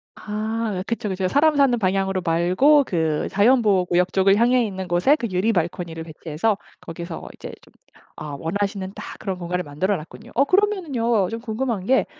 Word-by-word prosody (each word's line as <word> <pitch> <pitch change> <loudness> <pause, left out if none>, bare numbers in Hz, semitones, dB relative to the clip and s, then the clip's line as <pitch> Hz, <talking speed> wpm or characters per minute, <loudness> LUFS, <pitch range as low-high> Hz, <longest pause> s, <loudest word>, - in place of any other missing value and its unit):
아 215 -2 -3
그쵸그쵸. 200 -5 -2
사람 300 +8 +3
사는 275 -4 +4
방향으로 190 -1 0
말고 185 - +4
그 160 -6 -1
자연보호구역 195 -5 +3
쪽을 195 +1 +4
향해 245 +2 +3
있는 190 -2 -5
곳에 180 - +3
그 240 -6 -3
유리 185 +5 +1
발코니를 170 -1 -2
배치해서 165 +6 -2 0.2
거기서 170 0 -7
이제 - - -9
좀 - - -22 0.4
아 145 -2 -7
원하시는 195 +4 -3
딱 - - -8
그런 190 -3 -4
공간을 180 +1 -2
만들어 165 +7 -1
놨군요. 155 0 -12
어 275 - +5
그러면은요 285 - +1
좀 230 - -4
궁금한 230 -3 -2
게 265 +1 +3
195 Hz, 370 characters per minute, -22 LUFS, 180-235 Hz, 0.4 s, 어